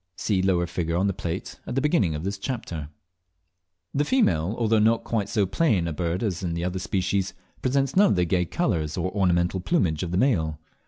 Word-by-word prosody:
(See 95 -2 0
lower 90 -2 +2
figure 85 -1 -2
on 95 - +2
the 100 - +1
plate 90 0 -5
at - - -4
the - - +3
beginning 130 - +2
of 75 - -5
this 100 +1 -3
chapter). 95 - -4 1.0
The 145 - +2
female, 110 - +2
although 115 -2 +2
not 115 +2 +3
quite 105 -4 -1
so 105 -2 +2
plain 95 - +1
a 80 - -2
bird 85 +4 -2
as 95 -6 -1
in 85 -3 -2
some 85 - -2
other 90 +1 -2
species, 95 0 -1 0.3
presents 135 +1 +1
none 200 +2 +6
of - - +2
the 90 -1 +2
gay 90 +1 +1
colours 80 -1 -1
or 95 +1 -1
ornamental 90 -2 +1
plumage 90 - +1
of 90 - -2
the 90 - -1
male. 85 - +1
95 Hz, 210 wpm, -25 LUFS, 85-110 Hz, 1.0 s, none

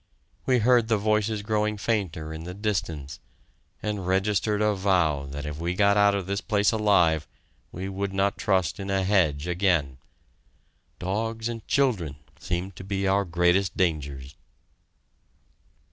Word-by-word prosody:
We 130 -1 +4
heard 120 0 +4
the 110 -1 +2
voices 105 0 0
growing 105 0 0
fainter 95 -8 -2
in 80 0 -7
the 90 +2 -7
distance, 85 -9 -3 0.6
and 105 -4 -3
registered 100 +2 +1
a 105 0 +2
vow 90 -8 +1
that 70 +2 -6
if 75 0 -5
we 85 +2 -2
got 100 +1 +4
out 100 -1 +4
of 100 -2 -2
this 100 +2 -2
place 105 -1 +2
alive 90 -9 +3 0.4
we 95 +3 -5
would 100 0 -3
not 95 +1 +1
trust 95 -4 0
in 100 0 -5
a 95 -1 +1
hedge 85 -7 +2
again. 85 -8 +1 1.0
Dogs 110 +5 -2
and 115 -2 -6
children 110 - +1 0.2
seemed 90 +2 -3
to - - -8
be 100 0 -2
our 100 +1 +2
greatest 90 +2 +1
dangers! 70 -6 -2
95 Hz, 145 wpm, -26 LUFS, 85-105 Hz, 1.0 s, We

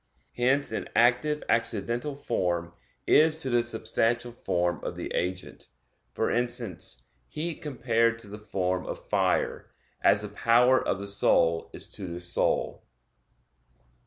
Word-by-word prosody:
Hence 130 +4 +2
an - - -4
active 125 +6 +3
accidental 115 +4 0
form 85 -10 -2 0.3
is 155 0 +5
to 130 - -2
the 120 0 +4
substantial 115 +1 0
form 85 -7 -1
of - - -4
the - - -5
agent 90 +1 -4 0.4
(for - - -1
instance, 120 0 -2 0.2
heat 160 - -5
compared 115 -4 +1
to 115 -2 -8
the 105 +1 -9
form 95 -3 -2
of - - -7
fire) - - 0 0.3
as 100 +1 +4
the 105 - -5
power 120 +5 +3
of - - -1
the 100 +1 -6
soul 85 -4 +3
is - - -4
to 95 - -7
the 85 0 -6
soul. 85 0 0
115 Hz, 135 wpm, -27 LUFS, 95-125 Hz, 0.4 s, is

